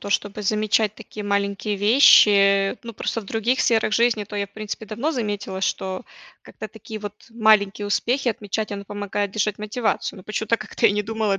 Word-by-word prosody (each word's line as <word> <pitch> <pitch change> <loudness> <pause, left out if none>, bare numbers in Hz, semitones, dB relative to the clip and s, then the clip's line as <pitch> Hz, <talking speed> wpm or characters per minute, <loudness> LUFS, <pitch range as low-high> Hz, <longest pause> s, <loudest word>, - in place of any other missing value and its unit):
то, 200 - -7
чтобы 205 +1 -1
замечать 215 +1 +1
такие 210 -1 -9
маленькие 200 +1 -1
вещи. 200 -3 +5
Ну, 230 - -7
просто 230 - -3
в - - -14
других 225 +5 0
сферах 225 -2 +2
жизни, 230 -1 +2
то 205 - -8
я, 200 - -1
в - - -31
принципе, 215 +1 -6
давно 230 +10 -2
заметила, 205 -5 -3
что 190 -1 -2 0.4
как-то - - -9
такие 220 -2 -9
вот 205 -1 -6 0.2
маленькие 215 -3 +3
успехи 245 +5 0
отмечать- 215 -1 -3
оно 200 0 -6
помогает 205 0 -3
держать 210 0 -1
мотивацию. 215 0 -2
Но - - -12
почему-то 220 +1 -1
как-то 220 +1 0
я 205 - +3
не 210 0 0
думала 215 -2 -1
210 Hz, 185 wpm, -22 LUFS, 200-220 Hz, 0.4 s, вещи